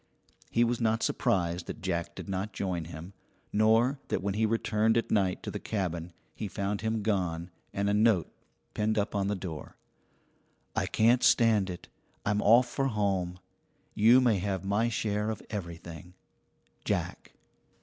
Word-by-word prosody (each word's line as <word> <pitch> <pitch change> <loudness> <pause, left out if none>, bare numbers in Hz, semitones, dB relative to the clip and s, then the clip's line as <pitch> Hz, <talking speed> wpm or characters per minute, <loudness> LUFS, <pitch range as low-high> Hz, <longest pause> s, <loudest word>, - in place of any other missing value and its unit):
He 120 - +3
was 120 0 0
not 115 0 +1
surprised 85 -2 0
that - - -6
Jack 85 -2 -2
did - - -8
not 95 +2 -3
join 90 -4 -2
him, 85 +3 -9 0.4
nor 115 +6 +3
that - - -2
when 100 0 0
he 110 +2 +1
returned 110 0 +1
at 115 - -1
night 95 -3 +1
to - - -4
the - - -4
cabin 90 -5 -3 0.2
he 110 - -5
found 100 0 -3
him 110 -1 -1
gone 90 -5 -1 0.2
and 100 0 -1
a 100 - +2
note 105 -6 +3 0.4
pinned 110 +1 0
up 105 0 0
on 100 -1 0
the 105 - 0
door: 85 -5 -7 1.0
I - - 0
can't 120 +3 +3
stand 110 -5 +4
it 90 - -7 0.4
I'm 105 0 +1
off 120 +4 +6
for 135 +2 -1
home. 95 -6 -1 0.6
You 115 +5 +6
may 115 -6 +3
have 95 -1 -2
my 105 +4 +1
share 105 -2 -1
of 110 - -4
everything. 85 -3 -7 0.7
JACK. - - -3
100 Hz, 160 wpm, -29 LUFS, 90-110 Hz, 1.0 s, off